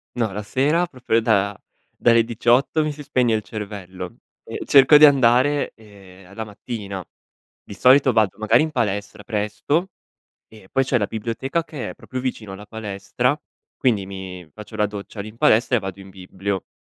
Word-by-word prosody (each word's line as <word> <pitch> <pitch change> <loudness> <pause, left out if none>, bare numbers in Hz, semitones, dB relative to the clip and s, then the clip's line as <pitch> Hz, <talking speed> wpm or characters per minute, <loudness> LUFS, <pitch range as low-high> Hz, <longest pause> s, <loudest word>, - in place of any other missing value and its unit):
No, 115 -4 0
la 105 +2 -5
sera 145 +11 +1
proprio 125 -7 0
da 100 -3 +1 0.4
dalle 115 -1 +4
18 120 +6 +2
mi 150 - -1
si 145 0 -9
spegne 125 -5 +1
il 110 - +1
cervello 100 -4 -7 0.3
e - - -7
cerco 140 +2 +7
di 150 - +9
andare, 140 +1 +4
ehm, 100 -3 -16
la 110 - -4
mattina. 100 -3 -7 0.6
Di - - -10
solito 130 +5 +5
vado 110 -3 +2
magari 110 +4 +3
in 155 - 0
palestra 105 -6 -2
presto 120 - -1 0.6
e 105 -4 -17
poi 135 0 +2
c'è 125 -2 +1
la 105 - 0
biblioteca 120 +9 -3
che 150 -5 -6
è - - -9
proprio 130 -1 -7
vicino 115 -6 -4
alla 100 +2 -9
palestra. 110 +5 -2 0.4
Quindi 110 -8 +1
mi 95 -3 -8
faccio 105 +1 -10
la 105 - +2
doccia 105 0 -8
lì 105 - -6
in 110 - -14
palestra 120 +2 +3
e - - -7
vado 95 -1 -6
in 95 0 -12
biblio. 95 +1 -5
110 Hz, 175 wpm, -22 LUFS, 100-130 Hz, 0.6 s, di